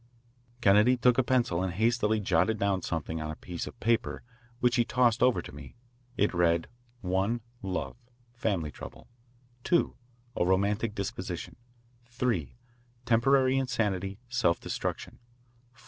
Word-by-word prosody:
Kennedy 105 +5 +5
took 125 0 +4
a - - +4
pencil 120 -9 +1
and 95 -2 -2
hastily 110 +1 +2
jotted 95 +2 +2
down 100 -2 0
something 80 -1 -3
on 75 - -4
a 75 - -4
piece 85 +1 -6
of - - -10
paper 115 0 0 0.4
which 125 0 +2
he 120 - +4
tossed 120 -1 +2
over 125 -1 +3
to - - -10
me. 70 -1 -11 0.4
It 105 - +2
read: 85 -1 +2 0.4
1.Love, 100 +2 -2 0.4
family 100 -10 -1
trouble. - - -11 0.6
2.A 120 - -1
romantic 100 +4 +1
disposition. 100 -2 -5 0.6
3.Temporary 120 - 0
insanity, 105 -7 -1
self 120 -8 +1
destruction. - - -4 0.5
4. 115 - -25
110 Hz, 125 wpm, -29 LUFS, 95-120 Hz, 0.6 s, Kennedy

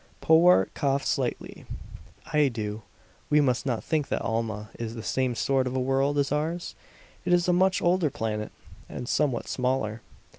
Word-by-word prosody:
Powart 160 - +5
coughed 140 -1 0
slightly. - - -2 0.7
"I 150 -1 +4
do. 110 -3 -4 0.5
We 150 - +4
must 135 -2 +1
not 120 -4 -1
think 155 -3 0
that - - -2
Alma 110 -2 -3
is 115 0 -4
the 115 - -7
same 130 -1 0
sort 130 +1 +1
of 125 - -3
a - - +1
world 135 +2 +1
as 140 -1 +1
ours. 160 +4 -2 0.5
It 180 - -1
is 175 0 +3
a 180 - +4
much 185 +1 +2
older 175 -2 +3
planet, 105 -4 -3 0.4
and 120 - -6
somewhat 135 -3 0
smaller. 125 -4 -1
135 Hz, 170 wpm, -27 LUFS, 115-150 Hz, 0.7 s, Powart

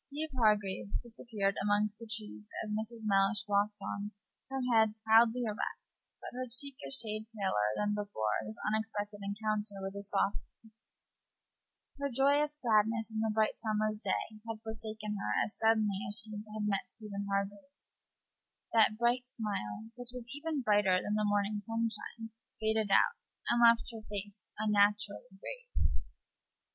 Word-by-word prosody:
Steeve 300 +1 -4
Hargraves 210 -4 +2
disappeared 225 -4 -2
among 205 +1 +3
the 230 -1 -10
trees 210 - -4 0.2
as 210 - -3
Mrs. 220 +1 -4
Mellish 195 +1 +3
walked 205 +1 +2
on, 205 +1 -3 0.4
her 270 0 -2
head 220 -1 +5
proudly 225 +2 +6
erect, 215 -2 -5
but - - -8
her 255 0 -4
cheek 275 +3 -3
a - - -5
shade 220 -4 -1
paler 105 - +2
than 210 0 +1
before 200 - -1
this 110 0 -7
unexpected 210 -1 -1
encounter 210 0 -2
with 195 0 -4
the 200 - -5
softy. 200 +2 -2 1.3
Her 280 0 0
joyous 285 +3 +3
gladness 225 -1 +2
in 220 - -2
the 220 0 +1
bright 215 +1 +1
summer's 215 -1 0
day 215 -2 -2
had 220 -1 -5
forsaken 215 -1 -3
her 105 - 0
as 215 - -9
suddenly 215 -3 +3
as 205 - -1
she 220 -1 -3
had 215 0 -5
met 200 -2 0
Stephen 200 -2 -5
Hargraves; 200 +8 -4 0.7
that 220 -1 +6
bright 240 +2 +2
smile, 210 - -3
which 245 0 -8
was 245 - -7
even 290 -2 -2
brighter 205 -3 +4
than 205 +3 -1
the 210 -1 +2
morning 205 0 +1
sunshine, 225 +1 -3 0.3
faded 220 -1 +2
out, 465 - +4 0.3
and 240 - +3
left 235 0 +6
her 225 - -7
face 205 0 -4 0.2
unnaturally 210 0 +2
grave. - - -2
215 Hz, 150 wpm, -33 LUFS, 205-230 Hz, 1.3 s, proudly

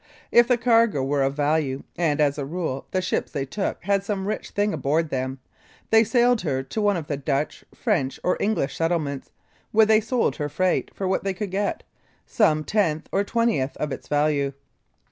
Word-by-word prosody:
If 235 0 +6
the 250 -1 +3
cargo 230 - +3
were 140 +1 0
of 135 +1 +1
value, 145 -2 0
and, 160 -4 0
as 145 -1 +2
a - - -2
rule, 150 -3 -4
the 185 -1 -1
ships - - -1
they 135 -1 -2
took 195 +9 -3
had 200 +1 +1
some 200 -1 -3
rich 215 - -3
thing 205 0 0
aboard 155 +3 0
them, 130 0 -2 0.5
they 225 0 +7
sailed 240 +1 +3
her 135 -6 -1
to 135 +11 -4
one 205 -2 +2
of 165 - -5
the 145 -1 -3
Dutch, 140 +1 -2
French 165 - -1
or 180 - +2
English 200 -10 0
settlements, 160 -5 -1 0.4
where 220 0 +6
they 215 0 +4
sold 235 +3 0
her 150 -1 -2
freight 185 +5 0
for 190 - -2
what 190 - 0
they 195 -1 -2
could 200 0 -4
get 200 +2 -1 0.4
some 155 -9 +2
tenth 165 -5 0
or 200 - +2
twentieth 220 - 0
of 150 - -3
its - - -6
value. 145 -2 +1
170 Hz, 195 wpm, -24 LUFS, 145-210 Hz, 0.5 s, they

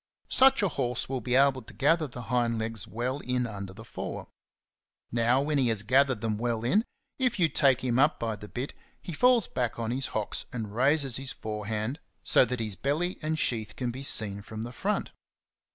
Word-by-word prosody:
Such 265 -4 +5
a - - +4
horse 125 -5 -2
will 130 -1 -3
be 125 +3 0
able 135 -1 +4
to - - -14
gather 155 +3 +3
the 120 -1 -8
hind 120 -1 +1
legs 110 -2 -3
well 125 +4 -2
in 125 -2 -1
under 100 -4 -6
the 95 - -11
fore.^^ - - -6 0.8
Now 120 +3 +3
when 150 -1 +1
he 130 - +3
has 110 -3 0
gathered 130 +1 +3
them 110 -2 -1
well 115 -1 -1
in, 210 - +3 0.3
if 250 -3 +1
you 175 -4 +4
take 135 -3 +3
him 125 -1 +1
up 150 +3 +4
with 110 -2 -2
the 105 - -8
bit, 125 +6 -5 0.3
he 175 - -7
falls 245 +4 +4
back 120 -1 -2
on 115 -1 -2
his 130 +2 -1
hocks 105 -2 -4
and 110 -4 -5
raises 135 +1 +2
his 135 0 -3
forehand 110 +5 -3 0.2
so - - +5
that 125 0 -3
his 110 -3 -3
belly 150 - -1
and 155 0 -1
sheath 110 -7 -1
can 125 -2 -2
be 130 +3 -7
seen 105 -7 0
from 110 +1 -7
the 120 - -6
front. 205 +10 -2
125 Hz, 205 wpm, -28 LUFS, 110-140 Hz, 0.8 s, Such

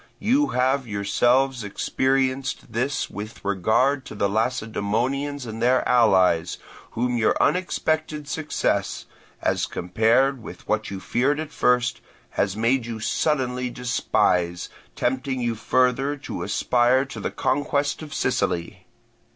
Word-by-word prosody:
You 270 +7 +2
have 130 +1 +1
yourselves 120 +5 +1
experienced 130 +4 -1
this 130 +5 -1
with 105 0 -9
regard 110 +8 +2
to - - -8
the 100 - +1
Lacedaemonians 120 +5 -1
and 110 0 -6
their 125 +2 +3
allies, 95 -9 +3 0.4
whom 125 +1 0
your 110 - +2
unexpected 155 -3 0
success, 155 0 -1 0.4
as - - +1
compared 115 +8 +1
with - - -11
what - - -1
you 95 - -5
feared 135 +9 0
at 155 -1 -5
first, 125 0 +1 0.3
has 100 0 -1
made 115 +2 +1
you 115 -1 -5
suddenly 125 -1 0
despise, 90 -8 0 0.3
tempting 130 +1 -1
you 120 -1 0
further 130 +5 +1
to - - -6
aspire 125 +2 +2
to 135 - -8
the - - -2
conquest 145 +1 0
of 155 -1 -9
Sicily. 90 -4 -2
125 Hz, 125 wpm, -24 LUFS, 110-135 Hz, 0.4 s, their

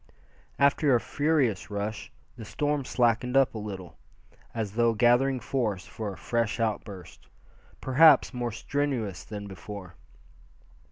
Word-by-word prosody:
After 140 -1 +3
a - - +3
furious 145 -7 0
rush, 105 +3 -4 0.2
the 120 - -9
storm 145 +5 -2
slackened 125 +1 +1
up 135 -2 +4
a 110 - -5
little, 95 -5 -8 0.5
as 110 -4 -3
though 115 +1 +2
gathering 125 +4 +3
force 110 -7 -2
for 110 -2 -6
a 95 - -10
fresh 115 -1 -1
outburst, 105 -4 -4 0.5
perhaps 145 +3 +5
more 120 -1 -2
strenuous 120 -5 -2
than 105 -1 -7
before. 95 -1 -9
115 Hz, 125 wpm, -27 LUFS, 105-130 Hz, 0.5 s, perhaps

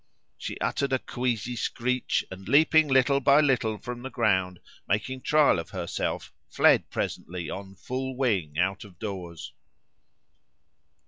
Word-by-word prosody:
She - - -6
uttered 140 -1 -1
a - - +4
queasy 125 -2 -2
screech; 125 +2 -1
and, 95 +2 -9
leaping 155 +3 +5
little 135 +1 +4
by 140 +2 +5
little 125 -7 +2
from 120 +2 -7
the 135 - -6
ground, 95 -7 +1 0.3
making 120 +7 -1
trial 150 - +4
of 85 - -7
herself, - - -3 0.2
fled - - +4
presently, 85 -1 -4
on 95 0 -7
full 130 +5 -4
wing, 95 - 0
out 95 +3 0
of 95 -4 -15
doors." 90 -5 -6
120 Hz, 135 wpm, -27 LUFS, 95-130 Hz, 0.3 s, leaping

